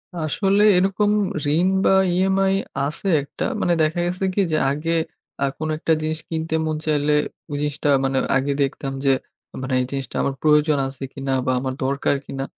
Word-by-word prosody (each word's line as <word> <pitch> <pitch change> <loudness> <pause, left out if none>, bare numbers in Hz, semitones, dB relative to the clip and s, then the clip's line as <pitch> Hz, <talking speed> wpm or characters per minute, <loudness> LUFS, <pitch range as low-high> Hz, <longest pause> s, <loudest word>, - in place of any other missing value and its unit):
আসলে 195 +6 +1
এরকম 195 +3 +2 0.5
ঋণ 180 +2 +3 0.2
বা - - +5 0.2
EMI 190 +1 +2 0.3
আছে 155 +7 -4 0.2
একটা 145 - -5 0.2
মানে 175 - +2
দেখা 160 +3 0
গেছে 180 +2 -2
কি 205 - +3
যে 155 - +2
আগে 160 +4 -1 0.5
আ - - +4
কোন 155 - -3
একটা 160 0 +1
জিনিস 155 0 -2
কিনতে 160 0 -2
মন 155 - -1
চাইলে 150 -1 +1 0.4
ওই - - -2
জিনিসটা 150 0 -1
মানে 135 0 0 0.2
আগে 140 +1 0
দেখতাম 135 0 -3
যে 135 - +5 0.5
মানে 130 0 -3
এই - - -1
জিনিসটা 135 -1 -5
আমার 140 - 0
প্রয়োজন 150 -1 +4
আছে 135 0 -8
কিনা 135 -1 -3
বা 130 - +1
আমার 130 0 -3
দরকার 140 +1 +1
কিনা। 135 0 -5
155 Hz, 175 wpm, -22 LUFS, 140-175 Hz, 0.5 s, বা